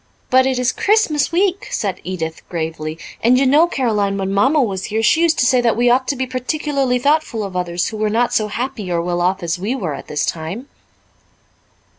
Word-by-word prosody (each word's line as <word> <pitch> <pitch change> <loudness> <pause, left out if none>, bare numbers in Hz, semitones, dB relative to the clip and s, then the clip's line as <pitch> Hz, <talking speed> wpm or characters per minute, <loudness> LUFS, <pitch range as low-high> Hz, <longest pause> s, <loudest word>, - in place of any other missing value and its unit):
"But 260 +1 +5
it 260 -1 0
is 250 0 +1
Christmas 395 -10 +1
week," 370 +2 0
said 200 -4 -3
Edith 165 -3 -4
gravely, 160 -2 -4 0.3
"and 245 +2 +5
you 270 - +3
know, 295 +6 +5
Caroline, 210 - 0
when 195 0 -2
Mamma 265 +10 +3
was 195 -8 -1
here 220 +1 -2
she 320 - +4
used 330 -1 +3
to - - +3
say 250 0 +4
that 230 -2 +1
we 240 0 +3
ought 260 +1 +2
to 280 - 0
be 260 0 -2
particularly 260 +1 -1
thoughtful 280 -4 +1
of 195 -2 -6
others 175 -1 -1
who 220 - -7
were 215 0 0
not 235 +3 +1
so 215 - +1
happy 230 -3 -4
or 170 - +1
well 175 +1 -1
off 185 +1 0
as 170 +1 -2
we 215 +8 -2
were 180 - -3
at 140 - -8
this 150 -1 -1
time." 170 - -5
230 Hz, 215 wpm, -18 LUFS, 185-265 Hz, 0.3 s, But